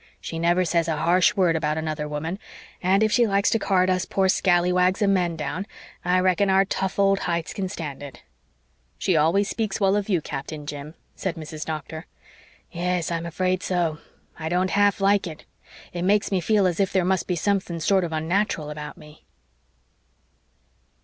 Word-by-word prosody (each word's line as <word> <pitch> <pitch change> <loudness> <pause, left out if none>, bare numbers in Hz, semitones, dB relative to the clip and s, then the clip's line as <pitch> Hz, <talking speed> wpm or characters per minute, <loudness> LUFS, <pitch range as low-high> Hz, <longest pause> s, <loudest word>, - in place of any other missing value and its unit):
She 165 - -6
never 175 +2 +2
says 170 -1 +1
a 160 -2 -1
harsh 180 +6 +3
word 180 -5 +3
about 155 -1 0
another 155 -1 -3
woman, 160 +6 -4 0.4
and 190 +3 +3
if 215 - +2
she 235 0 +4
likes 200 -1 +2
to 225 - +2
card 185 -3 +2
us 185 0 +1
poor 190 0 +1
scalawags 180 +1 +3
of 200 - +3
men 175 -3 +1
down 160 +6 -4 0.4
I 180 +1 +2
reckon 185 +2 +2
our 190 +1 +4
tough 190 0 -2
old 195 0 +3
hides 170 -2 -2
can 190 -2 -3
stand 150 -8 -6
it." 135 - -10 0.7
"She 185 - +1
always 165 +6 +3
speaks 220 -2 -2
well 195 -1 +3
of 205 0 -1
you, 185 -4 +3
Captain 150 0 -6
Jim," 145 +2 -7 0.2
said 190 -3 -3
Mrs. 155 -1 -7
Doctor. 160 +1 -6 0.6
"Yes, 175 -1 -1
I'm 170 0 -2
afraid 185 +2 -1
so. 170 -5 -1 0.4
I 160 0 -3
don't 180 +2 +1
half 205 0 +3
like 200 -1 +3
it. 160 -2 -9 0.5
It 175 - -4
makes 200 +3 +2
me 190 -2 +1
feel 205 +2 +2
as 180 -1 0
if 195 -1 +2
there 185 -2 +1
must 185 -2 0
be 180 - 0
something 185 -1 -1
sorter 185 +1 +2
unnateral 160 -1 -1
about 150 0 -7
me." 150 0 -15
180 Hz, 185 wpm, -24 LUFS, 160-195 Hz, 0.7 s, she